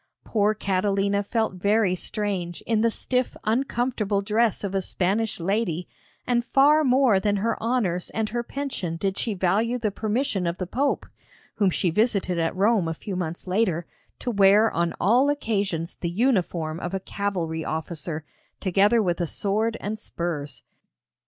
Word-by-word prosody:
Poor 215 -1 +1
Catalina 200 0 +1
felt 220 0 -1
very 205 -1 +3
strange 185 -2 -3
in 225 -2 +1
the 230 - +4
stiff 250 +2 -1
uncomfortable 235 -3 0
dress 220 +1 +1
of 200 -1 -3
a 195 - +1
Spanish 200 +5 -1
lady, 180 -2 -1 0.4
and 240 -1 +1
far 290 +5 +4
more 255 -6 +4
than 205 +1 +1
her 225 +3 0
honours 215 -7 0
and 220 -1 -2
her 240 +2 -1
pension 240 -10 -4
did 195 +2 -1
she 220 -1 -2
value 210 +7 +1
the 220 -4 -1
permission 215 -3 -1
of 170 +1 -2
the 185 - -3
Pope 275 +10 0 0.5
(whom 200 -3 +2
she 180 0 0
visited 200 -3 +1
at 165 +2 0
Rome 200 -2 +3
a 165 - -2
few 195 +3 -6
months 170 -2 -4
later) 185 -3 0 0.3
to 245 - -3
wear 205 +1 +5
on 170 0 -1
all 250 +7 +4
occasions 200 - -1
the 170 - -3
uniform 175 -7 0
of 180 +1 -4
a - - -1
cavalry 180 -5 -3
officer, 160 0 -4 0.4
together 205 +4 +3
with 175 -2 0
a 170 - 0
sword 215 +6 0
and 215 +2 -4
spurs. 155 -8 -4
200 Hz, 160 wpm, -25 LUFS, 180-225 Hz, 0.5 s, wear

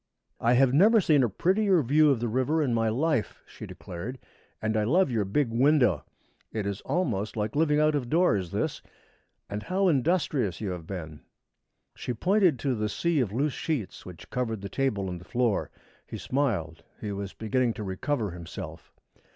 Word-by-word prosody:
"I 120 +1 +3
have 130 0 +4
never 210 +10 +6
seen 155 -7 +4
a 120 - +2
prettier 185 - +2
view 150 +5 +4
of 135 -5 +2
the 120 - -1
river 130 +7 +1
in 130 -4 0
my 115 -1 +2
life," 125 0 0
she - - -10
declared, 105 +10 -7 0.4
"and 110 0 -1
I 110 - +2
love 155 - +3
your 110 -4 0
big 115 +5 0
window. 125 - +3 0.5
It 110 -3 -3
is 100 0 -3
almost 120 - -1
like 105 +2 -2
living 150 -1 +3
out 155 0 +3
of 135 -5 -2
doors, 115 - +2
this. 100 - -2 0.7
And 105 +1 -4
how 190 - +1
industrious 140 - +1
you 105 -4 -3
have 85 -3 -7
been!" 80 -6 -7 0.7
She 125 - -5
pointed 185 - +3
to 135 -2 +1
the 105 -2 -1
sea 170 +6 0
of 115 -7 0
loose 140 +5 0
sheets 145 - -3
which 90 -3 -12
covered 115 -5 -2
the 100 - -6
table 105 -8 -1
and 90 -2 -5
the - - -11
floor. 120 +2 0 0.4
He - - -6
smiled. 100 - -1 0.2
He 105 - -4
was 100 -1 -5
beginning 120 +1 0
to 110 - -6
recover 105 +3 -2
himself. 85 -1 -8
120 Hz, 185 wpm, -27 LUFS, 100-150 Hz, 0.7 s, never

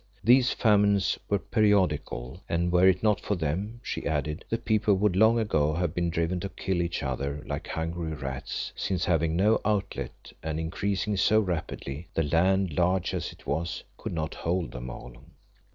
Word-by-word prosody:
These 125 +2 +6
famines 100 -4 +3
were 100 - +3
periodical, 90 - +1
and 85 +1 +1
were 90 +1 +5
it 95 +1 +3
not 105 -2 +3
for 105 - -1
them, 95 +8 -3
she - - -3
added, 75 +1 -2
the 115 - 0
people 110 -3 +2
would 100 -1 +2
long 110 +4 +5
ago 80 -9 +1
have 85 -2 -1
been 85 -1 0
driven 85 +2 0
to 100 - -4
kill 95 -1 -2
each 85 -3 -2
other 70 +2 -3
like - - -4
hungry 80 0 -3
rats, 70 -2 -5
since 90 -3 -1
having 80 -2 +1
no 105 +5 +3
outlet 105 -2 -3
and 80 0 -3
increasing 100 +5 -1
so 110 +3 +4
rapidly, 85 -5 -3
the 80 - +2
land, 90 +4 +2
large 90 +2 +1
as - - -3
it - - -17
was, 85 +4 -2
could - - -6
not 80 -2 -2
hold 85 0 -2
them 60 0 -6
all. 60 0 -9
90 Hz, 175 wpm, -28 LUFS, 80-100 Hz, -, These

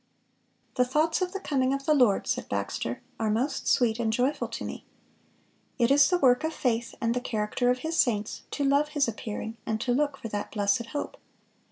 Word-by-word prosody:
(473) 250 - +5
"The 250 - -7
thoughts 320 +5 +2
of 365 -1 0
the 390 - -4
coming 265 -2 +2
of 275 0 -6
the 310 - +4
Lord," 250 -9 +3
said - - -2
Baxter, - - -3 0.2
"are 220 -1 0
most 240 +7 -1
sweet 235 -3 +3
and 225 -2 +1
joyful 250 +6 0
to - - -6
me."(474) - - -6 1.0
"It 240 - +1
is 285 0 +6
the 360 - +3
work 250 -3 +4
of 315 +1 -2
faith 235 -2 -1
and 230 -2 +1
the 250 - -1
character 225 +1 -1
of 250 - +2
His 330 +1 -1
saints 215 -4 +1
to 290 - -2
love 280 +2 +3
His 280 - +3
appearing 220 0 -5
and 220 0 -2
to 245 - 0
look 285 +1 0
for 230 - -6
that 205 -1 -4
blessed 205 +2 +1
hope." 290 +5 -5
250 Hz, 210 wpm, -27 LUFS, 225-285 Hz, 1.0 s, is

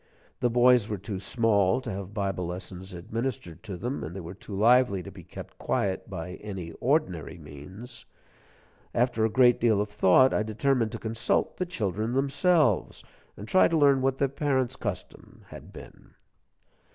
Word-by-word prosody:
The 125 - +2
boys 125 -2 +4
were 105 - -2
too 100 0 -6
small 100 -2 +2
to - - -5
have 95 0 -6
Bible 95 -4 -2
lessons 95 +1 -7
administered 105 -1 -5
to 100 -5 -7
them, 125 +8 -4
and 80 +4 -6
they - - -5
were 85 0 -8
too 100 +1 -9
lively 115 -2 +4
to 100 - -9
be 95 -1 -12
kept 90 - -11
quiet - - -1
by 90 +2 -6
any 95 -5 -6
ordinary 95 - 0
means. 85 - -9 0.9
After 120 -2 +1
a - - +1
great 125 +1 +4
deal 110 -3 +3
of 105 0 -2
thought, 100 +7 +5
I - - +2
determined 115 +2 0
to - - -3
consult 115 +1 -1
the 185 - -2
children 110 - -2
themselves, 140 +5 +2 0.3
and 105 - -8
try 185 - +5
to 165 - +1
learn 140 -3 +4
what 135 0 +1
their 140 - +2
parents' 135 -2 -1
custom 95 -6 -7
had - - -11
been. - - -14
110 Hz, 170 wpm, -27 LUFS, 95-130 Hz, 0.9 s, thought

